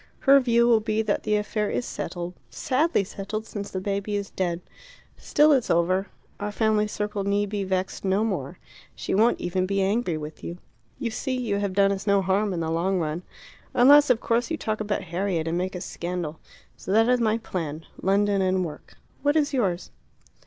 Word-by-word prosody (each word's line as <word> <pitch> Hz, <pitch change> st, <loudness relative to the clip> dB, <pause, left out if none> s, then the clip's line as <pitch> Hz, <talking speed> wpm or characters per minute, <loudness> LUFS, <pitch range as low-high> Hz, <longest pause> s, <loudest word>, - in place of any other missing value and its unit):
Her 275 Hz, 0 st, +7 dB
view 235 Hz, -2 st, +3 dB
will 230 Hz, -2 st, +5 dB
be 220 Hz, 0 st, 0 dB
that 210 Hz, -2 st, 0 dB
the 210 Hz, -, +1 dB
affair 210 Hz, 0 st, -1 dB
is 245 Hz, -, -2 dB
settled 175 Hz, 0 st, -5 dB, 0.2 s
sadly 285 Hz, -, +1 dB
settled 205 Hz, +3 st, -5 dB
since 205 Hz, -2 st, -6 dB
the 190 Hz, -, -3 dB
baby 200 Hz, +2 st, -2 dB
is 200 Hz, -1 st, -3 dB
dead. 175 Hz, -2 st, -2 dB, 0.5 s
Still 300 Hz, +1 st, +3 dB
it's 265 Hz, -5 st, +2 dB
over; 185 Hz, +3 st, +2 dB, 0.3 s
our 205 Hz, +1 st, -3 dB
family 215 Hz, 0 st, +2 dB
circle 210 Hz, -1 st, -3 dB
need 200 Hz, +1 st, 0 dB
be 205 Hz, -1 st, -2 dB
vexed 190 Hz, 0 st, -2 dB
no 195 Hz, +2 st, +2 dB
more. 180 Hz, -7 st, -3 dB, 0.4 s
She -, -, -3 dB
won't 220 Hz, +5 st, +3 dB
even 185 Hz, +1 st, -1 dB
be 195 Hz, +1 st, 0 dB
angry 195 Hz, -3 st, +1 dB
with 150 Hz, 0 st, -8 dB
you. 170 Hz, -, -5 dB, 0.4 s
You 245 Hz, -4 st, -3 dB
see, 260 Hz, +3 st, -2 dB
you 220 Hz, -5 st, -1 dB
have 200 Hz, -2 st, -1 dB
done 195 Hz, 0 st, +4 dB
us 200 Hz, +1 st, -4 dB
no 200 Hz, -1 st, +4 dB
harm 195 Hz, +3 st, +1 dB
in 175 Hz, -2 st, -2 dB
the 160 Hz, 0 st, -2 dB
long 180 Hz, +4 st, +1 dB
run. 160 Hz, 0 st, -2 dB, 0.5 s
Unless, 285 Hz, +4 st, +7 dB
of 245 Hz, -3 st, +4 dB
course, 235 Hz, +3 st, 0 dB
you 325 Hz, -, -1 dB
talk 215 Hz, -5 st, -2 dB
about 210 Hz, -1 st, -1 dB
Harriet 175 Hz, -1 st, -2 dB
and 165 Hz, -, -1 dB
make 185 Hz, +1 st, -3 dB
a 180 Hz, -, -5 dB
scandal. 170 Hz, -4 st, -4 dB, 0.4 s
So -, -, -6 dB
that 225 Hz, +2 st, +5 dB
is 250 Hz, -1 st, +3 dB
my 220 Hz, -1 st, +2 dB
plan 165 Hz, -8 st, -5 dB, 0.2 s
London 200 Hz, +1 st, +2 dB
and 185 Hz, -1 st, +1 dB
work. 150 Hz, -2 st, -10 dB, 0.3 s
What 290 Hz, +2 st, +2 dB
is 300 Hz, -2 st, +2 dB
yours?" 190 Hz, -9 st, -1 dB
200 Hz, 200 wpm, -25 LUFS, 185-220 Hz, 0.5 s, Her